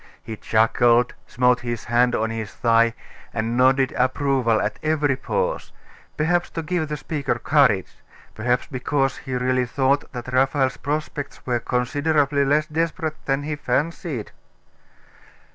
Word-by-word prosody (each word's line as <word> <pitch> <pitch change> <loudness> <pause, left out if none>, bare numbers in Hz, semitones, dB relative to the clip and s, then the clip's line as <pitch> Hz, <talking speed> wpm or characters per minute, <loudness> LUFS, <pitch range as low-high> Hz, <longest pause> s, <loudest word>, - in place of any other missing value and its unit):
He 110 - -6
chuckled, 115 +3 +3
smote 125 0 +2
his 120 -2 -4
hand 120 +1 +2
on 110 +1 -1
his 110 -2 -5
thigh, 115 -1 +3 0.4
and 115 +1 -1
nodded 130 +1 +3
approval 130 -3 +1
at 105 - -2
every 150 -3 +1
pause 480 - -2 0.5
perhaps 175 +3 +1
to 165 - -1
give 175 -1 -1
the 150 0 -4
speaker 145 -4 -2
courage 120 -9 +2 0.4
perhaps 120 +3 0
because 135 0 -1
he 130 - -5
really 125 0 +1
thought 135 +3 0
that 125 0 -7
Raphael's 135 0 +2
prospects 145 -1 -4
were 120 -2 0
considerably 140 +4 +1
less 145 +2 +2
desperate 160 0 -3
than 135 +1 0
he 150 +1 -3
fancied.... 145 - -2
130 Hz, 135 wpm, -23 LUFS, 120-150 Hz, 0.5 s, chuckled